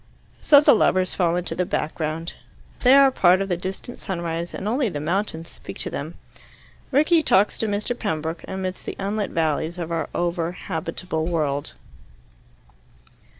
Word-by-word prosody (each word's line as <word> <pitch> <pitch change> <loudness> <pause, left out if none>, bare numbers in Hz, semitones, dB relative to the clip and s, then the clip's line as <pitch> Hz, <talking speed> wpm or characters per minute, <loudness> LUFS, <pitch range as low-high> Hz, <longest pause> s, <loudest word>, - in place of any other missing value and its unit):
So 285 - +7
the - - +6
lovers 185 -4 +2
fall 175 -2 +1
into 180 0 -2
the 180 - 0
background. 160 0 -3 0.5
They 255 +1 +6
are 275 -1 +7
part 185 -6 +4
of 195 0 -2
the 180 - +1
distant 190 +7 -6
sunrise, 170 -2 -3
and 195 - -5
only 245 +2 +1
the 150 - -4
mountains 165 +1 -2
speak - - -10
to - - -4
them. - - -5 0.8
Rickie 310 +4 +4
talks 205 -8 +3
to 225 - +1
Mr. 210 +4 -1
Pembroke, 160 -7 -3
amidst 185 -1 -5
the - - -4
unlit 205 +1 -2
valleys 160 +1 -1
of 170 -1 -4
our 165 -1 -2
over 175 -1 -1
habitable 165 -1 -4
world. 150 -4 -1
180 Hz, 155 wpm, -23 LUFS, 165-205 Hz, 0.8 s, So